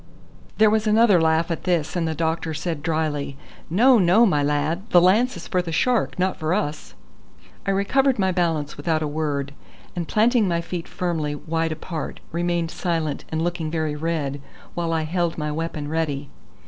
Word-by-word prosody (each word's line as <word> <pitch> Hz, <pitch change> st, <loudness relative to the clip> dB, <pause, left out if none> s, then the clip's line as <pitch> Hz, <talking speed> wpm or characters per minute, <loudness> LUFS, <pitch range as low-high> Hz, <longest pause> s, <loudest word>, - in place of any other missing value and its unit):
There 215 Hz, -1 st, +5 dB
was 215 Hz, 0 st, +1 dB
another 215 Hz, -4 st, +5 dB
laugh 160 Hz, +1 st, +2 dB
at 165 Hz, -, -3 dB
this, 175 Hz, -4 st, 0 dB
and 170 Hz, -2 st, 0 dB
the 160 Hz, -, -2 dB
doctor 160 Hz, 0 st, -1 dB
said 160 Hz, -1 st, -3 dB
drily: 155 Hz, -4 st, -2 dB, 0.3 s
"No, 235 Hz, +8 st, +5 dB
no, 190 Hz, +6 st, +5 dB
my 150 Hz, -9 st, +2 dB
lad; 150 Hz, +8 st, -1 dB
the 175 Hz, -, +6 dB
lance 215 Hz, +8 st, +3 dB
is -, -, -9 dB
for 185 Hz, -4 st, +1 dB
the 170 Hz, -2 st, -6 dB
shark, 245 Hz, +7 st, +1 dB
not 185 Hz, +1 st, 0 dB
for 155 Hz, +3 st, 0 dB
us." 150 Hz, -6 st, -3 dB, 0.7 s
I -, -, +2 dB
recovered 250 Hz, +7 st, +2 dB
my 190 Hz, -2 st, +2 dB
balance 165 Hz, -5 st, -1 dB
without 155 Hz, +2 st, 0 dB
a -, -, -1 dB
word, 145 Hz, -2 st, -2 dB, 0.4 s
and 170 Hz, -2 st, -3 dB
planting 225 Hz, 0 st, +3 dB
my 170 Hz, -1 st, +1 dB
feet 170 Hz, 0 st, -5 dB
firmly 160 Hz, -5 st, -2 dB
wide 165 Hz, +2 st, -2 dB
apart, 160 Hz, +1 st, -5 dB
remained 170 Hz, 0 st, -1 dB
silent 165 Hz, -5 st, -2 dB
and 160 Hz, 0 st, -1 dB
looking 175 Hz, -2 st, -2 dB
very 155 Hz, -2 st, -1 dB
red, 150 Hz, -3 st, -2 dB, 0.3 s
while 170 Hz, -1 st, -2 dB
I 160 Hz, -1 st, 0 dB
held 170 Hz, +1 st, -1 dB
my 150 Hz, -1 st, -2 dB
weapon 155 Hz, -1 st, -4 dB
ready. 145 Hz, -3 st, -2 dB
165 Hz, 180 wpm, -23 LUFS, 155-185 Hz, 0.7 s, the